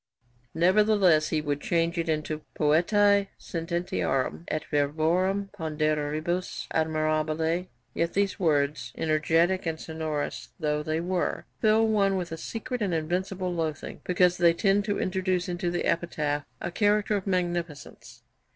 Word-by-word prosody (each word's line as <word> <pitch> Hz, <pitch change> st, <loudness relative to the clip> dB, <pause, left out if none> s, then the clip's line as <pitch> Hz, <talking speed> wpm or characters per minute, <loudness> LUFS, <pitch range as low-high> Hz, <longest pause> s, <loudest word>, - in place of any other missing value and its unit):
Nevertheless 185 Hz, -2 st, +4 dB
he 155 Hz, -, 0 dB
would 145 Hz, -1 st, -2 dB
change 170 Hz, 0 st, 0 dB
it 165 Hz, -1 st, -2 dB
into 155 Hz, 0 st, -2 dB
'poetae 200 Hz, +6 st, +3 dB
sententiarum 170 Hz, -3 st, -2 dB
et 155 Hz, -, -2 dB
verborum 165 Hz, +7 st, +1 dB
ponderibus 155 Hz, +1 st, -1 dB
admirabili.' 155 Hz, +2 st, 0 dB, 0.3 s
Yet 170 Hz, 0 st, -1 dB
these 200 Hz, -1 st, +1 dB
words, 140 Hz, -7 st, +1 dB
'energetic 165 Hz, +3 st, +2 dB
and 160 Hz, -1 st, -2 dB
sonorous' 160 Hz, -2 st, -4 dB
though 150 Hz, -2 st, 0 dB
they 155 Hz, +2 st, -1 dB
were, 180 Hz, +1 st, -1 dB
'fill 220 Hz, +1 st, +4 dB
one 200 Hz, -3 st, +2 dB
with 175 Hz, -2 st, -4 dB
a 165 Hz, -, -4 dB
secret 240 Hz, +7 st, -5 dB
and 190 Hz, -5 st, 0 dB
invincible 180 Hz, +3 st, -2 dB
loathing, 160 Hz, -3 st, -4 dB
because 180 Hz, 0 st, +3 dB
they 170 Hz, -1 st, +5 dB
tend 200 Hz, +3 st, +2 dB
to 205 Hz, -1 st, -1 dB
introduce 185 Hz, -1 st, 0 dB
into 175 Hz, 0 st, -2 dB
the 175 Hz, 0 st, -2 dB
epitaph 150 Hz, -3 st, -1 dB
a -, -, -4 dB
character 210 Hz, +2 st, +2 dB
of 200 Hz, -1 st, -3 dB
magnificence.' 175 Hz, -5 st, -3 dB
170 Hz, 135 wpm, -27 LUFS, 155-185 Hz, 0.3 s, they